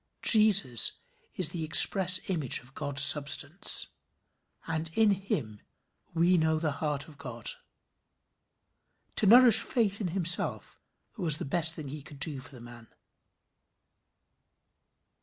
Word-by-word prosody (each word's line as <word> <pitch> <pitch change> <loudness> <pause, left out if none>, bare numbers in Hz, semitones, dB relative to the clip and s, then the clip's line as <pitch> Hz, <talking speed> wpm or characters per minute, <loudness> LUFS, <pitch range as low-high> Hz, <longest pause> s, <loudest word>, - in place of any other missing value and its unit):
Jesus 205 - +2 0.4
is 180 -4 -2
the 165 -3 -8
express 185 +3 +3
image 155 -9 -1
of 130 +2 -20
God's 140 0 +4
substance, 150 +6 +4 0.8
and 160 0 -6
in 220 -2 +1
him 145 - -7 0.5
we 175 +2 0
know 160 0 -2
the 155 -1 -4
heart 150 -2 -6
of 150 -3 -19
God. 120 -3 -6 1.7
To 210 - 0
nourish 235 0 +5
faith 220 -5 -4
in 195 - -4
himself 175 0 -1 0.4
was 165 -7 0
the 175 - -9
best 165 +2 -3
thing 150 -4 -10
he 150 +2 -10
could 145 +1 -16
do 145 -2 -4
for 130 - -13
the 130 -5 -16
man. 120 -1 -16
160 Hz, 125 wpm, -26 LUFS, 140-190 Hz, 1.7 s, nourish